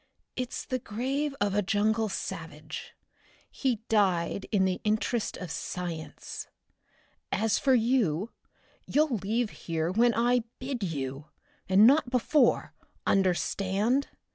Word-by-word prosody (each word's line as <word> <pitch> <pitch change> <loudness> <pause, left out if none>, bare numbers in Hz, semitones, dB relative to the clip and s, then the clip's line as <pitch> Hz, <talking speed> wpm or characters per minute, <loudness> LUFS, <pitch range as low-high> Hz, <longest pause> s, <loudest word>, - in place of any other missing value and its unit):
"It's 255 -1 -4
the 255 -2 -2
grave 270 +6 -2
of 205 -1 +1
a 205 - +3
jungle 215 +2 +1
savage. - - -6 0.6
He 245 -5 -1
died 195 -3 +1
in 195 -4 +3
the 185 -1 -1
interest 215 +2 0
of 180 -4 -6
science. 170 -3 -5 0.8
As 225 -1 +1
for 265 -2 +4
you, 225 -6 +1 0.6
you'll 295 -4 +2
leave 215 +3 -1
here 165 0 -2
when 230 +4 +3
I 240 +1 +3
bid 255 -2 -4
you, 140 -5 -3 0.4
and 195 +3 +7
not 270 +1 +5
before, 250 +1 +2 0.3
understand? 195 +6 +1
220 Hz, 115 wpm, -29 LUFS, 190-250 Hz, 0.8 s, and